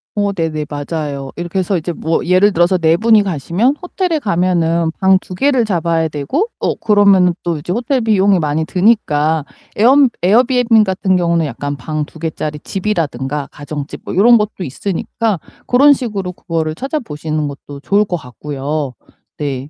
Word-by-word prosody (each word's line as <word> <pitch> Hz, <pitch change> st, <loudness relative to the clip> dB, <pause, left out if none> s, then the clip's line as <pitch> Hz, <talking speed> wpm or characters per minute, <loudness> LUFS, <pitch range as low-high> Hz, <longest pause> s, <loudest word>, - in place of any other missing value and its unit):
어 205 Hz, -1 st, 0 dB
네네 160 Hz, -4 st, -2 dB
맞아요. 145 Hz, -2 st, -4 dB
이렇게 175 Hz, +2 st, -3 dB
해서 185 Hz, +1 st, 0 dB
이제 175 Hz, +1 st, -4 dB
뭐 160 Hz, 0 st, -1 dB
예를 185 Hz, +4 st, +4 dB
들어서 175 Hz, +1 st, +2 dB
4 165 Hz, -1 st, +3 dB
분이 220 Hz, 0 st, +4 dB
가시면 190 Hz, -, 0 dB
호텔에 360 Hz, -2 st, -1 dB
가면은 170 Hz, -, +1 dB
방 190 Hz, 0 st, +3 dB
2 185 Hz, -, -9 dB
개를 265 Hz, +2 st, +2 dB
잡아야 170 Hz, -4 st, 0 dB
되고 155 Hz, -, -2 dB
어 -, -, 0 dB
그러면은 200 Hz, -4 st, +4 dB
또 170 Hz, -2 st, -1 dB
이제 150 Hz, +4 st, -6 dB
호텔 245 Hz, +5 st, 0 dB
비용이 200 Hz, -4 st, +3 dB
많이 155 Hz, 0 st, -1 dB
드니까 160 Hz, -7 st, +1 dB, 0.3 s
에엄 260 Hz, +5 st, +5 dB
에어비앤비 235 Hz, +3 st, +4 dB
같은 190 Hz, -1 st, 0 dB
경우는 170 Hz, -2 st, +1 dB
약간 145 Hz, 0 st, -4 dB
방 155 Hz, +3 st, -3 dB
2 160 Hz, -, -16 dB
개 165 Hz, +1 st, -2 dB
짜리 150 Hz, 0 st, -4 dB
집이라든가 150 Hz, -, -3 dB
가정집 145 Hz, 0 st, -7 dB
뭐 -, -, -6 dB
요런 235 Hz, +6 st, +6 dB
것도 210 Hz, -2 st, -3 dB
있으니까 195 Hz, -, -2 dB, 0.3 s
그런 280 Hz, +4 st, +6 dB
식으로 210 Hz, -9 st, -3 dB
그거를 165 Hz, -3 st, -3 dB
찾아보시는 155 Hz, -, -3 dB
것도 140 Hz, 0 st, -9 dB
좋을 200 Hz, +6 st, +2 dB
것 190 Hz, -4 st, -3 dB
같고요. 140 Hz, +1 st, -5 dB, 0.4 s
네. 140 Hz, -2 st, -4 dB
175 Hz, 345 characters per minute, -16 LUFS, 155-210 Hz, 0.4 s, 요런